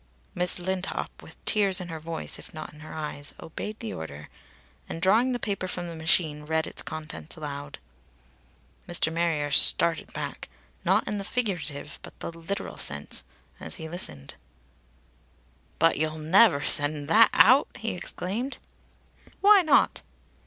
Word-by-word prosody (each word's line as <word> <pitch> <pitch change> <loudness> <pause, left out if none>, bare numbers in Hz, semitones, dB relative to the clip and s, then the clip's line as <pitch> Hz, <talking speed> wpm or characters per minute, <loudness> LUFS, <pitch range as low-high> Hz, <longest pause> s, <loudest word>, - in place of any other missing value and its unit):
Miss 180 0 +1
Lindop, 185 +1 -2
with - - -13
tears 200 -3 +3
in 180 -1 -6
her 160 -1 -5
voice 160 +1 -4
if - - -12
not 155 - -7
in 150 - -15
her 155 - -10
eyes, 150 -2 -6
obeyed 210 +6 -6
the 225 - -4
order 75 -2 -8 0.6
and, - - -5
drawing 220 +8 +4
the 245 - 0
paper 200 -5 -2
from 175 -1 -4
the 170 - -7
machine, 160 -1 +1
read 160 +1 0
its - - -5
contents 155 +1 -7
aloud. 145 -2 -6 1.1
Mr. 170 -2 +1
Marrier 165 -3 0
started 165 +3 +4
back - - -6 0.3
not - - +2
in 210 - -2
the - - -4
figurative 170 - -3
but - - -10
in - - -5
the 165 - -13
literal 195 +5 -5
sense 70 +1 0 0.4
as 80 - -5
he 160 - -7
listened. 75 - -4 1.4
"But 165 -3 +3
you'll 155 0 -1
never 160 0 +5
send 145 0 +2
that 225 +5 +7
out!" 260 +5 +6
he 225 -1 -2
exclaimed. 205 +8 -4 0.8
"Why 405 0 +8
not?" 315 - +3
165 Hz, 150 wpm, -27 LUFS, 150-195 Hz, 1.4 s, Why